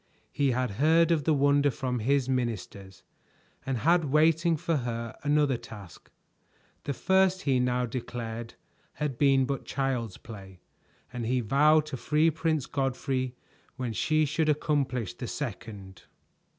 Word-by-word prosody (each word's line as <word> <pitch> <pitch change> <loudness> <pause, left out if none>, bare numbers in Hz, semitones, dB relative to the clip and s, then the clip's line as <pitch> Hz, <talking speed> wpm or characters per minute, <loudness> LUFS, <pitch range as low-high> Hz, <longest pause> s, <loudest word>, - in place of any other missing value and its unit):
He 140 -1 +1
had 125 -2 0
heard 165 +2 +4
of 155 -4 +1
the 160 - +3
wonder 145 +1 +3
from 125 -2 -3
his 135 +3 +1
ministers 110 -6 -4 0.6
and 135 -2 0
had 165 +7 +3
waiting 160 +3 +3
for 165 +2 -1
her 115 -2 -4
another 145 -3 +2
task. 100 -6 -12 0.8
The 140 - -1
first 190 +4 +2
he 135 -3 +2
now 125 0 +1
declared 115 -1 -6 0.4
had 145 -5 -4
been 135 -2 +4
but 135 0 -3
child's 125 -7 -2
play, 95 -5 -11 0.5
and 120 -2 -4
he 125 +1 +1
vowed 150 +6 +4
to 150 -3 -6
free 155 +5 +2
Prince 160 -3 -1
Godfrey 130 -2 -2 0.4
when 125 -3 -4
she 155 - +1
should 155 +2 0
accomplish 140 - 0
the - - -7
second. 100 -4 -7
135 Hz, 140 wpm, -28 LUFS, 120-150 Hz, 0.8 s, heard